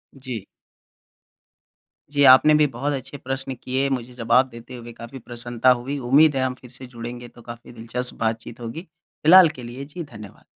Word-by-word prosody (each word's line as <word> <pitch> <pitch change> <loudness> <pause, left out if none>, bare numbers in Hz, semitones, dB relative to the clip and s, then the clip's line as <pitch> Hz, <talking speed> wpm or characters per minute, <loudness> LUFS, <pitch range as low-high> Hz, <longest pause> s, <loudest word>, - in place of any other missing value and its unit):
जी। 130 -3 -6 1.7
जी, 145 -1 +2
आपने 135 +3 +7
भी 150 0 +4
बहुत 140 +5 -2
अच्छे 135 +1 -6
प्रश्न 135 0 -3
किए, 130 +3 -2
मुझे 125 -2 -4
जवाब 125 +2 +3
देते 120 +1 -11
हुए 120 -1 -10
काफ़ी 120 +3 -9
प्रसन्नता 120 +1 -1
हुई। 140 +4 -4
उम्मीद 150 +2 +5
है 130 - +1
हम 130 -1 -1
फिर 125 - -13
से 130 +1 -11
जुड़ेंगे, 120 0 -8
तो 120 0 -17
काफ़ी 120 0 -11
दिलचस्प 120 +2 -4
बातचीत 115 +1 -3
होगी। 120 +7 -6 0.4
फ़िलहाल 175 +2 +8
के - - -8
लिए, 120 +4 -8
जी, 170 +5 -8
धन्यवाद। 110 - -13
125 Hz, 175 wpm, -22 LUFS, 120-135 Hz, 1.7 s, फ़िलहाल